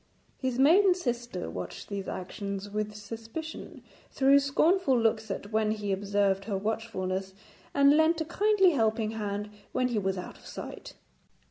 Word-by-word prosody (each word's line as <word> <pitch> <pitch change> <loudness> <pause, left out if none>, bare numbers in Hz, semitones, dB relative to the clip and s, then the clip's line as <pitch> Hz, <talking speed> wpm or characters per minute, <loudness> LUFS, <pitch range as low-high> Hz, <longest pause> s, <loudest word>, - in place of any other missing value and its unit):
His 260 -2 -1
maiden 355 +8 +6
sister 240 - -3
watched 90 +2 -6
these 200 -2 -5
actions 200 +2 -5
with 210 0 -3
suspicion, 225 +9 -8 0.3
threw 275 +1 +5
scornful 280 0 +3
looks 220 -1 +1
at 205 - -5
when 215 0 +2
he 210 -2 -2
observed 195 0 +1
her 200 -2 -1
watchfulness, 190 -3 -3 0.4
and 280 +1 +5
lent 320 +2 +4
a 320 - -1
kindly 390 +2 +3
helping 220 -5 +1
hand 210 -1 -4 0.2
when 255 0 +1
he 230 -3 0
was 190 -1 -1
out 180 - -7
of - - -19
sight. - - -8
220 Hz, 150 wpm, -29 LUFS, 200-280 Hz, 0.4 s, maiden